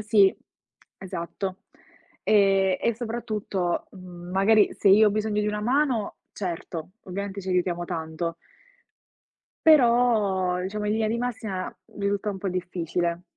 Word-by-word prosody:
Sì, 205 -3 +4 0.6
esatto. 185 +1 -5 0.7
Eh, 195 -2 +4
e 235 - +1
soprattutto, 215 -6 -2
mhmm 180 -2 -10
magari, 205 +3 +4
se 200 - +3
io 210 +3 +7
ho - - -1
bisogno 215 0 0
di 210 - -1
una 210 0 -1
mano, 250 -1 +1 0.2
certo, 170 -2 -5
ovviamente 200 +1 -5
ci 190 - -8
aiutiamo 175 -1 0
tanto 165 0 -4 1.3
però, 230 - +4
diciamo, 210 +3 -3
in 210 - +1
linea 220 0 +1
di 230 - 0
massima 220 -6 -4 0.2
risulta 200 +1 -1
un 195 - -5
po' 195 0 -3
difficile. 175 -1 -2
195 Hz, 130 wpm, -25 LUFS, 180-215 Hz, 1.3 s, io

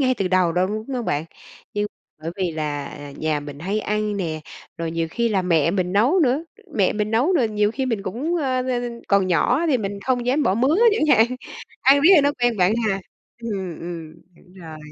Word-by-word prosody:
ngay 255 -2 +3
từ 195 -5 -1
đầu 185 -2 +2
đâu, 180 +2 +2
đúng 215 +3 -4
không 245 -2 -2
bạn? 145 -4 -1 0.5
Nhưng 205 0 0 0.4
bởi 165 - -3
vì 185 -3 -1
là, 150 -2 -3
à, 145 0 -9
nhà 155 -1 -1
mình 145 -1 -9
hay 195 +7 -2
ăn 210 0 -1
nè, 160 -5 -3 0.4
rồi 165 -1 -3
nhiều 165 0 -2
khi 235 +6 0
là 195 -3 +1
mẹ 165 -3 +2
mình 180 -1 -1
nấu 245 - +3
nữa, 280 +2 +2 0.3
mẹ 200 -6 +2
mình 210 0 -2
nấu 245 +11 +2
rồi 250 -11 +2
nhiều 210 -1 +1
khi 265 +3 -2
mình 225 -5 -1
cũng, 265 - -2
ơ, 260 -5 0
ơ, 245 -1 0 0.3
còn 200 -2 +3
nhỏ 215 - +2
thì 275 -6 +2
mình 200 -1 -4
không 245 -2 0
dám 270 +4 +2
bỏ 190 - +2
mứa 260 +8 +2 0.2
chẳng 360 -7 +1
hạn. 220 +1 +5 0.5
Ăn 275 +1 +5
riết 315 +6 +6
rồi 305 - +6
nó 285 - +3
quen 240 -2 +2
bạn 180 +1 +3 0.2
ha? 195 -1 -1 0.4
Ừm, 190 -7 -4
ừm, 165 -2 -7 0.2
đúng 180 - -21
rồi. 165 -4 -10
205 Hz, 225 wpm, -22 LUFS, 175-245 Hz, 0.5 s, riết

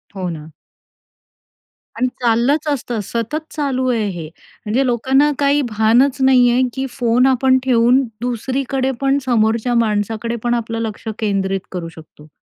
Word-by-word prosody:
हो 185 -2 -3
ना. 155 -1 -8 1.5
आणि 255 - +1
चाललंच 245 +6 +1
असतं, 245 -5 -2
सतत 235 +9 -3
चालू 265 -4 -1
आहे 225 -4 0
हे. 170 -4 -6 0.4
म्हणजे 250 +6 +1
लोकांना 265 +4 +2
काही 285 +1 +3
भानच 225 +6 +3
नाहीये, 250 -1 +4
की 265 0 -3
फोन 245 0 +1
आपण 260 0 +3
ठेवून 250 +1 +3 0.2
दुसरीकडे 260 +2 -2
पण 275 +1 +2
समोरच्या 230 0 +1
माणसाकडे 215 +2 -2
पण 240 0 +1
आपलं 230 -1 -2
लक्ष 220 0 -5
केंद्रित 195 -3 -1
करू 175 -3 -5
शकतो. 155 -2 -15
240 Hz, 135 wpm, -18 LUFS, 220-265 Hz, 1.5 s, नाहीये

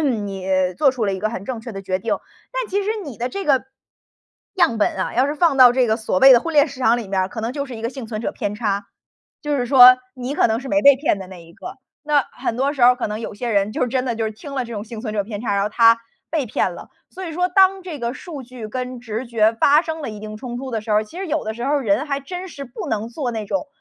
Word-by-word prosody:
你 205 -8 -2 0.3
做 280 -3 +5
出 245 -4 -2
了 200 - 0
一 190 - -5
个 215 - 0
很 195 -4 -6
正 240 -2 -4
确 235 - -8
的 195 0 -7
决 185 0 -1
定。 225 - -1 0.4
但 - - -3
其 400 +1 0
实 420 - -1
你 275 -6 -9
的 245 +2 -2
这 395 +7 -5
个 270 -3 +2 0.9
样 290 - +2
本 205 - +1
啊， - - -3
要 255 +3 +3
是 290 - -2
放 315 -3 +2
到 250 -2 +8
这 255 -1 +2
个 220 - +2
所 220 -5 -1
谓 270 0 +9
的 240 - +8
婚 330 +1 -5
恋 290 +1 +5
市 270 -1 -11
场 240 -1 +4
里 215 -5 -6
面 190 -1 0
儿， 185 - -2
可 225 - -6
能 230 +3 -3
就 280 0 -3
是 255 - -8
一 220 - -9
个 230 - -1
幸 255 -3 -8
存 215 -1 -5
者 - - -3
偏 205 0 -3
差。 205 -2 -2 0.6
就 295 -1 -1
是 245 - -1
说 255 -1 +9 0.2
你 255 +2 -4
可 - - +4
能 225 0 0
是 265 - -8
没 295 0 +2
被 280 -1 +8
骗 265 -7 0
的 190 - -8
那 175 -3 -11
一 165 - -17
个， - - -9 0.3
那 295 -2 +2
很 230 - -3
多 275 +3 +1
时 270 -4 -3
候 250 +1 +7
可 245 - -2
能 210 +1 -4
有 220 - -6
些 235 +3 -4
人 205 0 +1
就 255 - 0
真 255 +1 -1
的 235 -3 -2
就 225 - -1
是 220 - -2
听 275 +6 -10
了 260 - -1
这 235 - -9
种 210 -1 -5
幸 225 0 -8
存 220 -2 -4
者 205 - +1
偏 210 -1 -6
差， 215 - -1
然 200 - +1
后 205 - 0
他 230 +1 +5 0.3
被 300 -6 -1
骗 190 -4 -1
了。 - - -11 0.2
所 375 0 -8
以 325 - -6
说 360 +3 +1
当 380 +1 +4
这 335 -5 -7
个 235 +1 -3
数 300 -6 -8
据 240 -3 -9
跟 250 +1 -5
直 230 +1 -5
觉 225 -1 +3
发 290 +7 +4
生 320 -1 -5
了 - - -4
一 210 - -8
定 215 0 -7
冲 240 +1 -6
突 265 0 -6
的 225 -2 -2
时 215 0 -8
候 210 - +4
儿， 215 - -1
其 335 +12 -11
实 390 - -4
有 305 - -1
的 220 - -3
时 235 - -7
候 280 - 0
儿 285 -2 +1
人 220 +7 +1
还 280 -1 -2
真 360 +6 -7
是 280 -4 -8
不 245 - -7
能 220 +1 -2
做 245 0 -3
那 220 -2 -4
种 290 +5 -2
245 Hz, 330 characters per minute, -21 LUFS, 215-280 Hz, 0.9 s, 谓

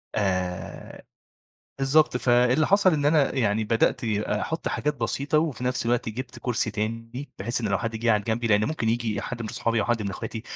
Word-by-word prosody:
آآ، 95 -3 -3 0.8
بالضبط، 135 +1 +3
فاللي 125 +4 +3
حصل 195 -2 +4
إن 145 -2 +1
أنا 150 -3 +3
يعني 110 -4 +1
بدأت 115 +2 +1
أحط 110 +9 -1
حاجات 150 +1 -1
بسيطة، 145 +3 0
وفي 145 -6 -1
نفس 125 -1 -1
الوقت 120 -1 +1
جبت 120 +2 -6
كرسي 120 -2 0
تاني، 115 +5 -4
بحيث 120 +1 -2
إنّه 110 -3 -2
لو 100 - +2
حد 115 -1 -3
جه 115 +1 +1
قعد 105 -2 +2
جنبي، 115 +1 -1
لأنّه 105 -1 +3
ممكن 155 -7 -2
ييجي 115 -3 0
حد 120 -2 -5
من 110 - -5
أصحابي 115 +1 0
أو - - 0
حد 120 -3 0
من 100 - -3
أخواتي 110 +4 -6
115 Hz, 195 wpm, -25 LUFS, 110-130 Hz, 0.8 s, حصل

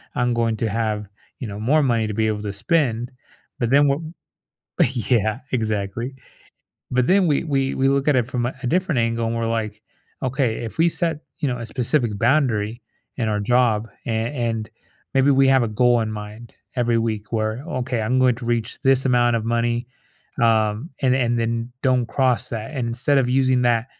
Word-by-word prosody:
I'm 125 0 +1
going 115 -1 +1
to 115 - -1
have, 105 -1 -2 0.3
you 125 - -5
know, 100 0 -6
more 145 +8 +3
money 115 -4 +1
to 105 - -4
be 110 +1 +1
able 105 -1 -1
to 100 -1 -4
spend," 120 - 0 0.5
but 120 -3 0
then 140 +2 +5
wha 140 - +2 1.1
Yeah. 110 -1 +2
Exactly. 110 +2 -2 0.8
But 125 0 +2
then 190 0 +4
we 150 -1 +1
we 135 -3 0
we 135 0 +2
look 140 0 +1
at 145 - +4
it 120 -2 +1
from 125 -2 -1
a 125 - -4
a - - -3
different 180 -4 +1
angle 115 0 0
and 115 +1 -2
we're 115 0 -1
like, 105 -1 -8 0.4
"Okay, 130 -3 0
if 115 - -7
we 165 +1 +5
set," 165 -2 -1 0.2
you 145 - 0
know, 125 -1 -2
a 115 - -6
specific 120 -3 0
boundary 120 -3 +1 0.3
in 115 -4 -1
our 105 -1 0
job 115 -1 +2 0.2
and 115 +2 -1
and 115 -4 -2 0.4
maybe 135 +1 +4
we 135 -1 +4
have 130 -2 +5
a - - -2
goal 120 +2 +3
in 110 -1 -2
mind 105 +2 -8 0.2
every 120 -1 +2
week 110 -1 -3
where, 110 +2 -1 0.2
"Okay, 125 -2 -2
I'm 120 +4 +1
going 130 -1 +4
to 125 - -8
reach 115 -2 -1
this 135 -1 +3
amount 120 -2 +3
of 110 - -2
money," 120 +1 0 0.6
um, 110 +4 +2
and 130 -1 +3
and 120 -2 +1
then 115 +1 -2
don't 130 -3 +2
cross 130 -3 +1
that. 115 +5 -5
Instead 125 +3 +1
of 125 -2 +1
using 130 -1 +3
that 120 -1 +2
120 Hz, 195 wpm, -22 LUFS, 110-130 Hz, 1.1 s, then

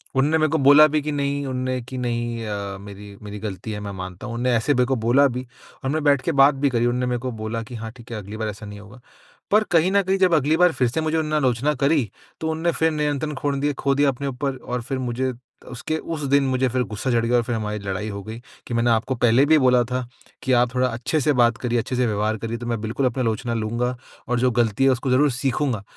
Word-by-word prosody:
उनने 145 +4 +3
मेरे 155 -1 +2
को 160 - +2
बोला 145 +2 +7
भी 150 0 0
कि, 150 +1 -3
"नहीं 140 0 -1
उनने 130 0 -2
की 130 +2 -8
नहीं 120 -1 -2
अ, 100 -2 -4
मेरी 100 0 -11
मेरी 105 0 -7
ग़लती 105 +1 -6
है 105 - -4
मैं 100 -1 -6
मानता 95 -1 -7
हूँ।" 115 - -5
उनने 125 +1 0
ऐसे 130 +6 +2
मेरे 125 -1 +2
को 135 - 0
बोला 140 +4 +5
भी 125 0 -5 0.4
और 135 - -1
मैं 155 -1 -1
बैठ 140 -3 +4
के 165 - -1
बात 140 0 +5
भी 140 +1 +1
करी 120 -2 +1
उनने 125 +1 0
मैं 125 -1 -1
को 130 +1 -4
बोला 110 +1 -4
कि, 120 +2 -10
"हाँ 110 -1 -6
ठीक 120 -1 -15
है, 115 - -4
अगली 105 +1 -8
बार 110 -1 -2
ऐसा 105 +1 -8
नहीं 105 0 -9
होगा।" 105 +4 -14 0.5
पर 215 +2 +5
कहीं 175 +2 +4
न 200 - +4
कहीं 190 +1 +1
जब 185 -2 +4
अगली 150 +2 +2
बार 180 0 +5
फ़िर 125 - +1
से 145 +7 -2
मुझे 155 +1 0
उनने 155 -1 -1
आलोचना 135 +1 +1
करी 140 -6 +2 0.3
तो 160 - -2
उनने 165 +2 0
फ़िर 160 0 +1
नियंत्रण 150 0 -1
खोड़ 140 +1 -1
दिए 145 +1 0
खो 140 0 0
दिया 145 0 +3
अपने 140 +1 -3
ऊपर 135 +1 -2
और 125 -1 -4
फ़िर 130 +3 -4
मुझे 130 +1 -1 0.4
उसके 140 +6 -3 0.2
उस 155 - -6
दिन 140 0 +5
मुझे 130 0 +1
फ़िर 125 +1 0
गुस्सा 125 +5 -2
चढ़ 115 -1 +2
गया 120 +1 +2
और 120 - +2
फ़िर 120 0 -2
हमारी 105 -1 -3
लड़ाई 100 +2 -4
हो 100 -1 -6
गई 110 +2 -8 0.3
कि 120 - -5
मैंने 115 +1 +2
आपको 115 +4 +1
पहले 120 +2 +4
भी 155 +1 +5
बोला 125 -2 +4
था 125 -1 -1 0.4
कि 130 - 0
आप 120 0 +3
थोड़ा 130 0 +2
अच्छे 120 +6 -1
से 150 +2 +2
बात 120 -1 +4
करिए, 120 -1 -1
अच्छे 125 - -3
से 125 0 +2
व्यवहार 110 0 0
करिए 115 +2 -4
तो 120 - -7
मैं 115 -2 -1
बिल्कुल 115 +5 -1
अपनी 130 +1 0
आलोचना 115 +1 -1
लूँगा 120 +3 -1 0.3
और 125 0 0
जो 125 +1 +2
ग़लती 115 +1 +1
है 135 - +5
उसको 130 +1 -1
ज़रूर 140 +3 +4
सीखूँगा। 130 -3 -1
125 Hz, 265 wpm, -22 LUFS, 115-140 Hz, 0.5 s, बोला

